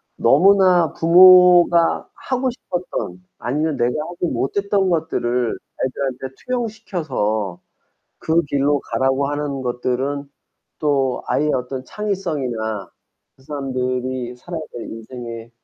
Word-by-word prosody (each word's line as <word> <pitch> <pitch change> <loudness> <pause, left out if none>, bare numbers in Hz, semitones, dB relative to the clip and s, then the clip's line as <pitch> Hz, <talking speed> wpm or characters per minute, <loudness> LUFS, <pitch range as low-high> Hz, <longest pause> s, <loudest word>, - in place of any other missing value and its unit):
너무나 185 -5 +4
부모가 175 0 +6
하고 255 0 -1
싶었던 175 - -5 0.2
아니면 150 +5 -1
내가 120 0 +2 0.2
하지 175 0 -3
못했던 200 +5 0
것들을 125 -8 0 0.3
애들한테 130 0 -3
투영시켜서 160 - -2 0.6
그 165 +1 +2
길로 140 0 +1
가라고 135 +4 0
하는 145 -2 -3
것들은 130 +3 -2 0.5
또 140 -4 0
아이의 150 +1 +1
어떤 130 +1 -3
창의성이나 130 - -3 0.5
그 130 - -22
사람들이 130 -3 -3
살아야 165 +6 -7
될 120 - -6
인생에 115 0 -8
140 Hz, 255 characters per minute, -20 LUFS, 125-175 Hz, 0.6 s, 부모가